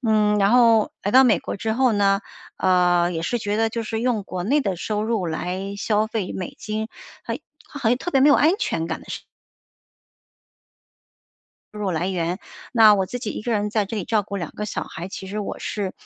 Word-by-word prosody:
嗯， 210 -2 +3
然 200 0 +3
后 230 -3 +5
来 205 - 0
到 260 +3 +7
美 225 -8 +4
国 - - -5
之 220 +1 -1
后 255 -2 +3
呢， 200 -1 +3 0.4
呃， 180 -1 +3
也 165 - -3
是 175 +9 -1
觉 210 0 -2
得 225 - +2
就 230 +1 -3
是 220 0 -3
用 235 -3 0
国 185 -2 -5
内 280 +8 +2
的 195 -3 -1
收 210 +4 -2
入 215 -5 -1
来 185 +5 -3
消 215 +1 +1
费 220 -4 -3
美 185 -2 -6
金， 215 +1 -4 0.3
好 - - -3
一 - - -9 0.3
好 290 - -8
好像 230 +2 +3
特 355 - -5
别 270 - +3
没 290 - +7
有 - - +7
安 315 +3 +4
全 165 - -1
感 160 - -3
的 - - -17
事 - - -4 2.5
入 210 - -6
来 - - -1 0.6
源， - - -15 0.2
那 220 -3 +7
我 190 -2 0
自 245 - -5
己 230 - -4
一 - - -5
个 235 - -1
人 210 -1 0
在 215 -2 +1
这 220 - -5
里 200 - -2
照 215 +1 +1
顾 200 0 -6
两 170 -5 -4
个 210 - -4
小 - - -3
孩， 170 +3 -7
其 190 - -7
实 205 +3 -5
我 205 - -5
是 200 -3 -3
210 Hz, 245 characters per minute, -23 LUFS, 190-225 Hz, 2.5 s, 到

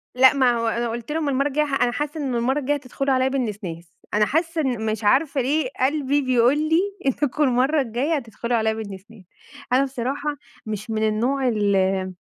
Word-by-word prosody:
لأ 260 +2 +7
ما 260 -3 +3
هو 230 -1 -1
أنا 235 +1 -1
قُلت 235 +4 -5
لهم 310 -2 -1
المرّة 275 +1 +1
الجاية 300 +2 +1
ح 270 -2 -1
أنا 245 - +3
حاسة 295 +4 -3
إن 260 -3 -2
المرّة 260 +5 +1
الجاية 290 +1 0
هتدخلوا 275 0 -2
عليَّ 260 0 +2
بالنسناس، 195 -10 -4 0.2
أنا 210 0 +4
حاسة 325 +3 0
إن 245 -5 -1
مش 215 0 -2
عارفة 275 +6 +2
ليه 275 +1 0
قلبي 285 +1 +1
بيقُول 255 +1 +3
لي 315 +2 +2 0.3
إنكم 290 +2 +1
المرّة 265 +4 +2
الجاية 260 +6 -1
هتدخلوا 235 -2 -2
عليَّ 220 0 +1
بالنسناس. 200 0 -9 0.5
أنا 265 - +5
بصراحة 275 +3 -3 0.3
مش 215 +1 -5
من 220 0 0
النوع 255 +5 0
ال 195 -4 +1
255 Hz, 185 wpm, -23 LUFS, 220-285 Hz, 0.5 s, لأ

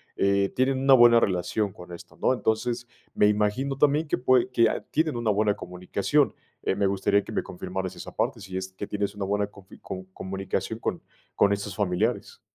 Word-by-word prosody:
eh, 100 0 +2
tienen 130 +1 +2
una 135 0 +5
buena 120 -2 +8
relación 95 +1 0
con 90 0 -12
esto, 85 - -11
¿no?, - - +3
entonces, 120 +1 -1 0.3
me 105 - +5
imagino 105 +7 +1
también 150 +2 +3
que - - 0
pue 125 0 +3
que, 115 -2 +4
a - - -2
tienen 155 -5 +1
una 115 -2 +1
buena 105 0 +2
comunicación, 90 -2 0 0.3
eh, - - 0
me 100 - +1
gustaría 100 +1 +2
que - - -9
me - - 0
confirmaras 95 +1 -5
esa - - -9
parte, - - -1
si 95 -2 -9
es 95 0 -4
que 100 +2 -7
tienes 100 -1 -2
una 100 - -3
buena 100 +1 0
confi 100 -2 -16
com 95 0 -7
comunicación 95 +1 -4
con - - -3 0.3
con 100 - +4
estos 100 -1 -4
familiares. 105 +4 -1
105 Hz, 195 wpm, -26 LUFS, 95-120 Hz, 0.3 s, buena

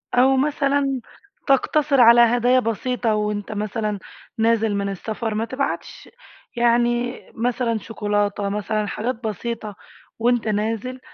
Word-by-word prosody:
أو 260 +2 +5
مثلًا 275 -1 +1 0.5
تقتصر 275 0 +3
على 235 0 +8
هدايا 245 +2 +4
بسيطة، 230 0 -1
وأنت 210 -1 -2
مثلًا 210 0 -2 0.4
نازل 225 -2 +2
من 200 0 -1
السفر، 215 +3 -4
ما 225 +1 -1
تبعتش 265 +3 -4 0.5
يعني 240 +1 +1
مثلًا 235 0 0
شوكولاتة، 205 -2 -1
مثلًا 210 +1 -2
حاجات 235 +5 -2
بسيطة، 220 -1 -5 0.4
وأنت 240 -1 +1
نازل 225 +4 -2
230 Hz, 115 wpm, -22 LUFS, 210-250 Hz, 0.5 s, على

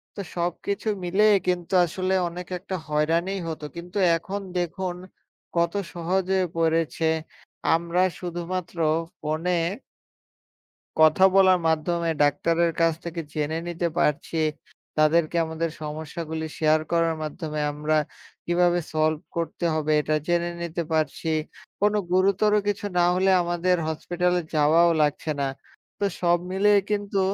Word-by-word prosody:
তো - - -8 0.2
সবকিছু 175 +5 -2 0.2
মিলেই 205 +4 +4
কিন্তু 180 0 -1
আসলে 185 +3 -2 0.2
অনেক 175 +1 -8
একটা 190 +1 -5
হয়রানিই 165 +6 0
হত। 155 - -6
কিন্তু 175 +3 -7 0.2
এখন 200 +4 -5 0.2
দেখুন 175 +1 -2 0.6
কত 170 +1 +2 0.2
সহজে 185 +2 0 0.2
পড়েছে। 165 0 +1 0.7
আমরা 170 +2 0 0.2
শুধুমাত্র 175 0 -5 0.4
ফোনে 155 +4 -1 1.5
কথা 155 +4 +6
বলার 185 -2 +6
মাধ্যমে 165 +1 0
ডাক্তারের 165 +4 +2
কাছ 165 0 +4
থেকে 170 0 -4
জেনে 155 +1 -1
নিতে 175 0 -1
পারছি, 150 +1 0 0.6
তাদেরকে 155 +2 +3
আমাদের 160 +1 -2
সমস্যাগুলি 160 +1 -5
শেয়ার 155 0 +3
করার 165 -1 +2
মাধ্যমে 155 0 -4
আমরা 150 +1 0 0.5
কিভাবে 175 0 +3
সলভ 155 0 +1
করতে 170 +1 -3
হবে, 155 -1 0
এটা 155 +1 0
জেনে 175 0 +1
নিতে 170 0 -3
পারছি। 155 +1 -1 0.5
কোন 205 +1 +3 0.2
গুরুতর 195 +3 +3
কিছু 205 0 -1
না 175 - +5
হলে 190 +1 +2
আমাদের 175 +1 +1
হসপিটালে 180 +3 0
যাওয়াও 160 +3 +5
লাগছে 150 +1 0
না। 140 - +1 0.5
তো 205 - +1 0.2
সব 175 0 +4
মিলিয়েই 200 +1 +4
কিন্তু 205 -1 -1
170 Hz, 125 wpm, -25 LUFS, 160-180 Hz, 1.5 s, কথা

